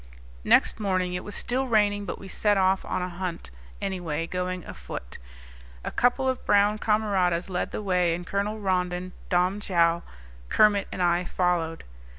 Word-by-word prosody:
Next - - +4
morning 185 -3 0
it 180 - -3
was 210 - -6
still 260 +2 -1
raining, 205 -3 +2
but - - -4
we 195 - -10
set 205 +2 +1
off 190 0 +3
on 180 - -2
a - - -2
hunt, 175 - -5 0.3
anyway, 175 -5 -2
going 180 0 -3
afoot. - - -8 0.6
A - - -4
couple 250 +2 +2
of 260 -1 -1
brown 205 +1 +3
camaradas 195 -5 +1
led 180 - -1
the - - -5
way, 180 -3 +2
and 175 +1 -7
Colonel 205 +3 -2
Rondon, 180 -2 -1 0.2
Dom 180 +3 +2
Joao, 170 -4 +2 0.5
Kermit, 205 -2 +4
and 185 - -2
I 175 0 +2
followed. 175 -3 -1
185 Hz, 165 wpm, -26 LUFS, 175-205 Hz, 0.6 s, Next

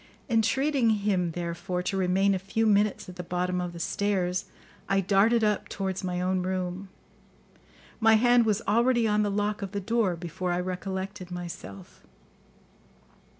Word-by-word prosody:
Entreating 245 +3 +2
him, 190 -4 +1
therefore, 175 +1 -3
to 195 - -2
remain 190 +1 +2
a 190 - -1
few 200 +4 -1
minutes 210 -1 +2
at 180 0 -10
the 180 - -5
bottom 180 +1 -1
of 180 -1 -4
the 170 - -9
stairs, 185 -1 -1 0.4
I 195 - +3
darted 205 +5 +3
up 210 -1 0
towards 190 -1 -3
my 180 -1 -2
own 185 +1 0
room. 185 +1 -3 1.1
My 225 -1 +6
hand 240 +1 +5
was 210 0 +1
already 235 +2 +3
on 210 0 +2
the 205 - +1
lock 205 +1 -1
of 195 0 -5
the 200 - -1
door 210 -2 0
before 175 +1 -4
I 175 - 0
recollected 190 +1 -4
myself. 170 - -8
195 Hz, 155 wpm, -27 LUFS, 180-210 Hz, 1.1 s, My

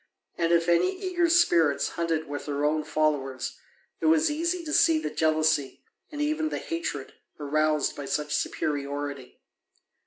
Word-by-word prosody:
And 170 -1 0
if 170 0 +3
any 270 - +2
eager 360 -3 0
spirits 170 - +3
hunted 165 -2 -2
with 145 +1 -6
their 145 0 -1
own 155 +1 +1
followers 150 -4 -1 0.4
it - - 0
was 315 -1 +4
easy 335 +3 -1
to 305 - -4
see 325 -1 +5
the 310 - -3
jealousy, 155 -3 +1 0.3
and 295 - -7
even 310 +1 0
the - - -3
hatred, 320 - -4 0.3
aroused 155 0 +1
by 145 - -6
such 150 +1 -2
superiority. 140 -3 -3
155 Hz, 150 wpm, -27 LUFS, -, 0.4 s, see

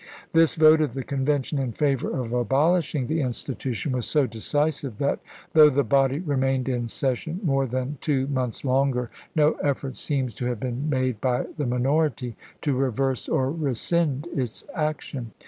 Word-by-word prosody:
This 165 -1 +4
vote 155 0 +6
of 145 -5 -1
the 135 - -3
Convention 140 +1 -1
in 130 -4 -2
favor 140 -2 0
of 120 -3 -3
abolishing 145 +3 +2
the 160 +4 -1
institution 130 +1 -2
was 125 -2 0
so 150 -3 +3
decisive 140 +1 0
that 140 +2 0 0.3
though 155 -1 +8
the 140 0 +2
body 135 +3 +2
remained 135 -5 0
in 120 -2 -1
session 135 +8 -2
more 135 -5 +1
than 130 +3 -3
two 135 -4 +1
months 130 -2 -2
longer 130 -2 +1 0.2
no 150 -1 +5
effort 135 -2 -1
seems 130 -5 -1
to 125 - -3
have 120 -3 -2
been 130 +5 -3
made 130 -5 0
by 125 -1 +1
the 145 -4 -2
minority 125 -1 0 0.3
to 145 - +1
reverse 135 0 0
or 130 +1 +1
rescind 150 +1 0
its 125 -5 -2
action. 145 -6 -3
135 Hz, 165 wpm, -25 LUFS, 125-150 Hz, 0.3 s, though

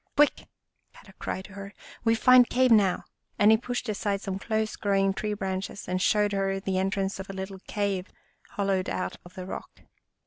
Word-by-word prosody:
"Quick!" 295 0 +3 0.5
Kadok - - -17
cried 190 - -4
to 200 - -13
her, 200 0 -9
" - - -19
We 225 0 +4
find 250 +1 +6
cave 255 0 +3
now! 200 -5 +4 0.2
" - - -46
and 205 +1 +6
he 220 - +6
pushed 245 +2 -4
aside 205 -1 -1
some 195 -1 -4
close 220 +1 -1
growing 195 -1 +1
tree 210 +1 -2
branches 190 0 -4
and 185 0 -1
showed 210 +1 +3
her 195 -1 0
the 190 -1 -1
en 190 +1 +1
trance 195 0 -2
of 190 - -7
a - - -5
little 190 0 -6
cave 200 -3 -1 0.5
hollowed 195 -2 0
out 185 - -3
of 175 - -15
the 185 - -6
rock. 190 - -8
200 Hz, 205 wpm, -27 LUFS, 190-215 Hz, 0.5 s, find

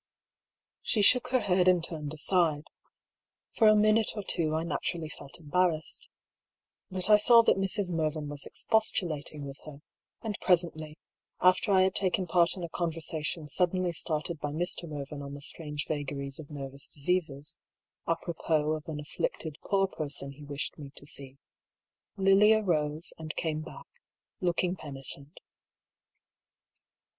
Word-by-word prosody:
She 210 - +1
shook 250 +5 +5
her 255 -1 +2
head 185 -2 +2
and 180 -2 +5
turned 150 -4 -3
aside. 155 -2 +2 0.9
For 220 - +4
a 215 - +7
minute 215 +1 +3
or 210 - -4
two 155 -4 0
I 160 - 0
naturally 165 0 -2
felt 140 -1 -10
embarrassed. 165 0 0 0.8
But 185 -1 -2
I 210 -1 +8
saw 230 +2 +7
that - - +3
Mrs. 195 -1 -1
Mervyn 155 -2 -1
was 145 -1 -5
expostulating 155 -9 -1
with 140 0 -8
her, 150 -1 -11 0.4
and 215 -3 -3
presently, 165 -4 +1 0.4
after 185 +3 +4
I 190 -1 +6
had 190 0 +2
taken 185 0 +1
part 175 +1 +2
in 180 - -5
a 170 - -4
conversation 160 -1 -2
suddenly 180 +3 +1
started 160 0 -2
by 145 - -3
Mr. 170 +2 -1
Mervyn 145 -1 -6
on 140 0 -7
the - - -8
strange 150 -1 -4
vagaries 140 -2 -4
of 150 - -10
nervous 140 -2 -6
diseases, 155 -1 -2 0.5
apropos 165 -2 0
of 155 -1 -5
an 155 -2 -4
afflicted 160 - -4
poor 195 -1 +2
person 140 -5 -2
he 145 +2 -13
wished 145 +2 -4
me 140 -2 -8
to - - -6
see, 140 -2 -9 0.8
Lilia 205 +3 +5
rose 155 -3 -1
and 160 -1 -6
came 155 -2 -2
back, 155 - -10 0.5
looking 180 -1 0
penitent. 140 -1 -9
160 Hz, 145 wpm, -29 LUFS, 150-185 Hz, 0.9 s, I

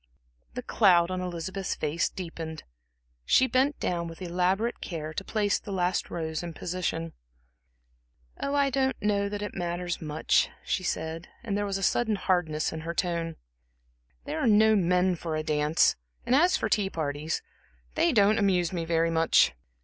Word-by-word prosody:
The - - -4
cloud 180 -5 +4
on 185 0 -2
Elizabeth's 180 +2 -3
face 155 +2 0
deepened. 165 -3 -7 0.6
She 260 - +4
bent 265 +3 +1
down 170 -1 -1
with 165 0 -9
elaborate 185 +5 0
care 155 -3 -5
to 190 - -4
place 205 0 0
the 205 - -9
last 180 -1 0
rose 160 -2 -3
in 170 -2 -7
position. 165 -2 -3 1.3
"Oh, 280 - -1
I 280 -1 +3
don't 265 0 0
know 200 -1 +1
that 205 0 -4
it 205 - -5
matters 175 0 -3
much," 155 0 +1 0.2
she - - 0
said, 165 -2 -3 0.2
and 210 -4 -2
there 205 0 -1
was 195 -1 -1
a 195 - -5
sudden 220 +3 +2
hardness 175 -7 0
in 160 - -5
her 170 +1 -5
tone. 170 -2 -1 0.9
"There 315 - -3
are 280 - +1
no 220 0 +5
men 180 -1 +2
for 160 -1 -4
a 155 - -2
dance, 150 0 +2 0.3
and - - +1
as 350 +7 +5
for - - -2
the - - -11
tea 200 -2 -1
parties 155 -1 -3 0.5
they 330 +2 +3
don't 215 -3 +4
amuse 185 -4 +2
me 170 -2 -2
very 165 0 +1
much. 165 0 +4
180 Hz, 170 wpm, -28 LUFS, 165-205 Hz, 1.3 s, no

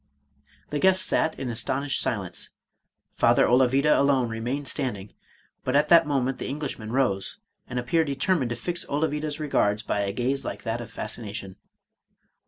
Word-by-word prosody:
The 145 - -1
guests 185 +2 +4
sat 160 - +1
in 125 -2 -3
astonished 130 +5 -1
silence. 95 -7 -3 0.6
Father - - +4
Olavida 130 +4 +4
alone 135 -4 +3
remained 120 +5 -3
stand 130 -7 -1
ing; 95 +1 -11 0.5
but 130 - -1
at 150 +1 +3
that 165 -2 +7
moment 135 -2 0
the - - -4
Englishman 135 -6 -4
rose, 120 -7 +1 0.3
and 125 - -5
ap 125 - -2
peared 160 +4 +2
determined 140 0 0
to 120 - -2
fix 175 +5 -3
Olavida's 150 0 -1
regards 110 -8 +1
by - - -1
a 100 -1 0
gaze 130 +5 -1
like - - -6
that 115 +1 -2
of 120 - -8
fascination. 100 -4 -6
130 Hz, 165 wpm, -26 LUFS, 115-145 Hz, 0.6 s, that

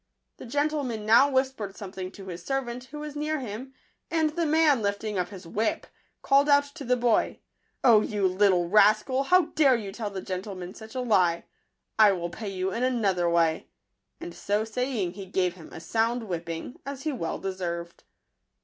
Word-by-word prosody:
The - - -10
gentleman 285 -5 -1
now 235 +6 +6
whispered 260 -7 -1
something 190 -2 -7
to 195 - -11
his 175 -2 -7
servant, 250 0 -3
who 295 +3 -9
was 300 -1 -7
near 305 +1 -1
him; 250 +2 -7 0.4
and 320 -2 +1
the 335 +1 -1
man, 300 -4 +4
lifting 205 0 -2
up 180 -1 -1
his 190 -3 -10
whip, 215 +6 -1 0.4
called 280 +1 +4
out 285 0 +6
to - - -8
the 250 -1 +1
boy, 240 -2 +1 0.2
" - - -46
O 225 -4 +7
you 205 -3 0
little 185 -2 +3
rascal! 215 +7 +4
how 365 +5 +5
dare 275 -5 +5
you 210 -4 -4
tell 210 +1 -4
the 195 -1 -5
gentleman 185 -1 -6
such 220 +3 -12
a 255 - -1
lie! 180 -8 +2 0.5
I 210 -2 +7
will 175 -2 -4
pay 210 +3 -6
you 190 0 -2
in 230 - -3
another 200 -9 +1
way 165 -2 +1 0.5
and 175 - -7
so 205 +4 -1
saying, 225 -5 -2
he 195 0 -9
gave 180 -2 0
him 175 -3 -13
a - - -8
sound 230 +6 0
whipping, 170 +2 -5
as 275 -1 -7
he 310 - -1
well 165 - -3
de 195 0 -4
served. 170 -2 -5
215 Hz, 190 wpm, -27 LUFS, 185-260 Hz, 0.5 s, O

